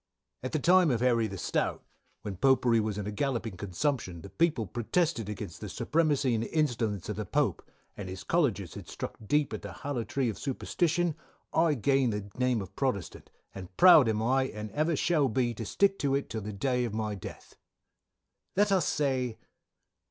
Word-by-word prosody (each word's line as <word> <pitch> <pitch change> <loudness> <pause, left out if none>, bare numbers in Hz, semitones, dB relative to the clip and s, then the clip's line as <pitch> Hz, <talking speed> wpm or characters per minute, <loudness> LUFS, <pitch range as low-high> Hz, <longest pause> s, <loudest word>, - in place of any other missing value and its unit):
"A. 130 - -3
At - - -10
the - - +2
time 180 +3 +5
of 120 -4 +1
Harry 120 -3 +3
the 95 -2 -7
stout, - - -1 0.4
when 100 -2 -4
Popery 125 +1 +3
was 105 -2 -2
in 105 - -3
a 105 - -3
galloping 115 -2 -2
consumption 95 - -2
the 100 - -10
people 155 - +1
protested 120 - -1
against 100 -4 -6
the - - -5
surpremacy 145 -5 +1
and 115 0 0
instalence 115 - -1
of - - -4
the - - -2
Pope; - - +1 0.3
and 100 -2 -6
his 95 0 -7
Colleges 120 - 0
had - - -9
struck - - -6
deep 145 +7 +1
at - - -4
the - - -7
hallow 140 -5 -3
tree 135 +2 -1
of 110 - -3
superstition 170 +5 0 0.4
I 160 -2 +3
gained 135 -1 +2
the 100 -1 -5
name 125 -4 +1
of 95 +1 -13
Protestant, 105 - -3 0.2
and 95 -1 -10
proud 165 -9 +8
am 110 0 0
I, 130 +3 +2
and 105 -4 -6
ever 155 +2 +1
shall 150 -3 +2
be 120 +1 0
to 115 0 -6
stick 195 -1 +2
to 140 -1 +1
it 140 - -3
till 110 - -3
the 105 +1 -5
day 125 +5 0
of 115 -3 -3
my 110 -1 -2
death. 100 - -9 1.0
"_Let 205 0 +4
us 190 -4 +3
say. 130 -5 0
125 Hz, 195 wpm, -29 LUFS, 105-145 Hz, 1.0 s, proud